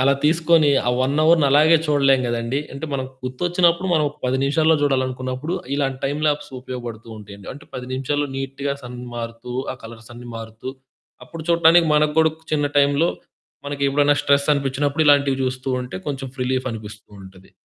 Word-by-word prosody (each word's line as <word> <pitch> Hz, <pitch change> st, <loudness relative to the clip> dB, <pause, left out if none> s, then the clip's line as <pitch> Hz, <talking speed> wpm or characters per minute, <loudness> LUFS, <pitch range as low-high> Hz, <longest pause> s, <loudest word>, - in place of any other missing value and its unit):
అలా 140 Hz, +1 st, +4 dB
తీసుకొని, 160 Hz, -1 st, +4 dB, 0.2 s
ఆ -, -, +4 dB
1 135 Hz, +2 st, 0 dB
అవర్‌ని 160 Hz, -2 st, +5 dB
అలాగే 155 Hz, +4 st, +6 dB
చూడలేం 140 Hz, -3 st, +3 dB
గదండీ! 120 Hz, +3 st, -1 dB
అంటే 140 Hz, +3 st, -5 dB
మనకు 130 Hz, -1 st, -3 dB
గుర్తొచ్చినప్పుడు 175 Hz, +6 st, +1 dB
మనం 155 Hz, -2 st, +2 dB
ఒక 150 Hz, -, -19 dB
10 130 Hz, -, +1 dB
నిమిషాల్లో 160 Hz, +3 st, +3 dB
జూడాలనుకున్నప్పుడు, 130 Hz, +3 st, -1 dB, 0.2 s
ఇలాంటి 135 Hz, -2 st, -1 dB
టైమ్ 145 Hz, +2 st, -3 dB
ల్యాప్స్ 150 Hz, 0 st, -1 dB
ఉపయోగబడుతూ 120 Hz, -3 st, -7 dB
ఉంటయండి. 100 Hz, -1 st, -12 dB
అంటే, 145 Hz, -, -14 dB
10 125 Hz, 0 st, -6 dB
నిమిషాల్లో 145 Hz, +2 st, -1 dB
నీట్‌గా 135 Hz, +1 st, -3 dB
సన్ 125 Hz, 0 st, -8 dB, 0.2 s
మారుతూ, 115 Hz, +1 st, -6 dB, 0.2 s
ఆ -, -, -15 dB
కలర్స్ 115 Hz, 0 st, -12 dB
అన్ని 120 Hz, 0 st, -10 dB
మారుతూ, 115 Hz, +3 st, -7 dB, 0.5 s
అప్పుడు 160 Hz, +5 st, -9 dB
చూడటానికి 170 Hz, 0 st, +5 dB
మనకు 150 Hz, 0 st, +2 dB
గూడా 160 Hz, 0 st, +5 dB, 0.2 s
చిన్న 145 Hz, -1 st, +2 dB
టైంలో 145 Hz, +4 st, +3 dB, 0.6 s
మనకి 140 Hz, 0 st, -4 dB
ఎప్పుడైనా 145 Hz, +1 st, +3 dB
స్ట్రెస్ 140 Hz, +1 st, +2 dB
అనిపిచ్చినప్పుడు 140 Hz, +2 st, 0 dB
ఇలాంటివి 140 Hz, -2 st, +4 dB
జూస్తూ 130 Hz, +1 st, -3 dB
ఉంటే 125 Hz, -7 st, -7 dB
కొంచెం 135 Hz, -2 st, -4 dB
ఫ్ 130 Hz, -, -10 dB
రిలీఫ్ 130 Hz, 0 st, -1 dB
అనిపిస్తూ 110 Hz, -1 st, -9 dB
ఉంటది. 95 Hz, 0 st, -15 dB
140 Hz, 165 wpm, -21 LUFS, 125-150 Hz, 0.6 s, అలాగే